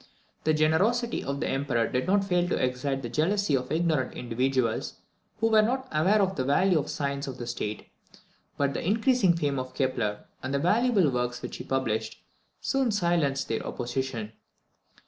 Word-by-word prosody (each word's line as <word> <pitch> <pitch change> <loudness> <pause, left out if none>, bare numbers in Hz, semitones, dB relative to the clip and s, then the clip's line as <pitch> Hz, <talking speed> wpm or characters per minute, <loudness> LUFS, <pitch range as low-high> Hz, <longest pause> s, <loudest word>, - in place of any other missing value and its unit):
The 155 - +4
generosity 200 +11 +2
of 140 +1 -3
the - - 0
Emperor 135 -4 0
did 125 +6 -1
not 200 +1 +3
fail 180 -2 +1
to - - +1
excite 130 +2 -1
the - - -3
jealousy 170 - +1
of 125 -1 -3
ignorant 155 -5 0
individuals, 125 0 -1 0.4
who 225 +1 +2
were 215 -1 +7
not 260 +4 -1
aware 190 +7 +3
of 190 0 -1
the 130 - -1
value 165 +6 +3
of 140 - -4
science 140 -1 -2
to 135 - -5
the 120 -1 -7
state; 110 -3 -4 0.7
but 140 -1 +1
the - - -3
increasing 220 -1 +3
fame 145 -4 0
of 130 0 -6
Kepler, 120 -6 -1 0.2
and 130 +2 -2
the - - +3
valuable 200 - +3
works 125 0 -2
which - - -5
he - - -7
published, 110 -5 -2 0.4
soon 270 -3 +1
silenced 170 -9 +1
their 115 - -1
opposition. 120 -3 -4
140 Hz, 175 wpm, -27 LUFS, 130-190 Hz, 0.7 s, were